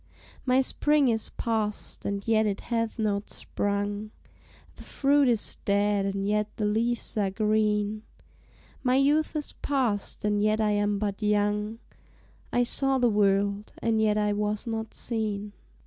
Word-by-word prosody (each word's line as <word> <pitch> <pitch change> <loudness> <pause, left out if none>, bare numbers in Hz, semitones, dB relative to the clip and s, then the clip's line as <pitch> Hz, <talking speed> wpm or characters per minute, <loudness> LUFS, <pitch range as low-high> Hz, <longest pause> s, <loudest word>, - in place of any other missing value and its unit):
My 255 +1 +4
spring 295 +1 +2
is 225 -1 -1
past, 215 -3 -3
and 200 +1 -3
yet 220 -1 +3
it 200 -1 -2
hath 230 -1 -2
not 210 -2 -1
sprung, 205 +1 -3 0.7
The - - -11
fruit 280 0 +2
is 230 -4 +1
dead, 200 0 +1
and 195 0 -2
yet 210 0 +1
the 215 - -1
leaves 230 +3 -1
are 200 -2 +2
green, 210 0 +1 0.8
My 255 -1 +2
youth 295 +4 +2
is 300 -1 -3
past, 240 -9 -1
and 205 0 +1
yet 215 +1 +2
I 215 -1 +2
am 205 0 +1
but 200 0 -3
young, 210 +1 0 0.7
I 245 - +3
saw 270 +2 +2
the 245 -2 +3
world, 200 0 +1
and 225 -1 +1
yet 215 -1 +2
I 210 -1 +1
was 210 +1 -1
not 225 -1 -4
seen. 210 -3 -3
210 Hz, 150 wpm, -27 LUFS, 205-230 Hz, 0.8 s, My